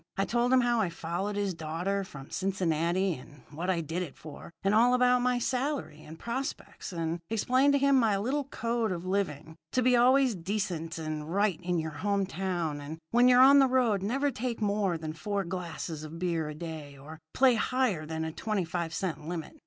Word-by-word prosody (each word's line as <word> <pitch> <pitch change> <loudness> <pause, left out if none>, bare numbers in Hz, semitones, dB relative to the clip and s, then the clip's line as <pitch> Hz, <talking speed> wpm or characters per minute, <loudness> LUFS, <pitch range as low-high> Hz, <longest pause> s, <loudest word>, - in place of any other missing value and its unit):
I 195 - +2
told 240 +1 +1
him 260 -1 +6
how 240 -1 +2
I 190 - 0
followed 170 +5 -3
his 200 -2 -1
daughter 170 +5 -2
from 140 -7 -11
Cincinnati, 185 -1 0
and 145 0 -12
what 170 +5 -4
I 175 -3 +1
did 165 +3 -3
it 170 -6 -6
for, 155 +1 -10
and 195 +1 +2
all 240 +3 +5
about 250 0 +4
my 250 0 +2
salary 255 - -2
and 160 +1 -11
prospects, 260 - -5
and 165 -1 -2
explained 255 +6 +3
to - - +4
him 280 0 +4
my 220 -4 +2
little 265 +8 -1
code 235 -4 -1
of 175 0 -4
living 165 -5 -2 0.2
to 255 - +2
be 250 0 +4
always 255 +1 +5
decent 175 -3 -3
and 155 -1 -4
right 200 -3 +1
in 180 0 -1
your 160 -1 -2
home 200 0 +1
town; 175 -6 -3
and 150 +3 -7
when 240 +1 +5
you're 250 0 +7
on 280 +1 +8
the 270 - +6
road, 245 -6 +2
never 270 +8 0
take 240 0 -3
more 200 -4 0
than 155 -1 -5
four 200 +5 -2
glasses 170 -3 -5
of 155 +2 -8
beer 165 -3 -1
a 150 - -7
day 155 -3 -7
or 155 +4 -11 0.2
play 260 -1 +5
higher 235 -7 0
than 160 +1 -4
a 160 - -3
twenty 210 +1 -2
five 165 -1 -3
cent 160 -5 -3
limit. 175 - -6
190 Hz, 205 wpm, -29 LUFS, 165-240 Hz, 0.2 s, on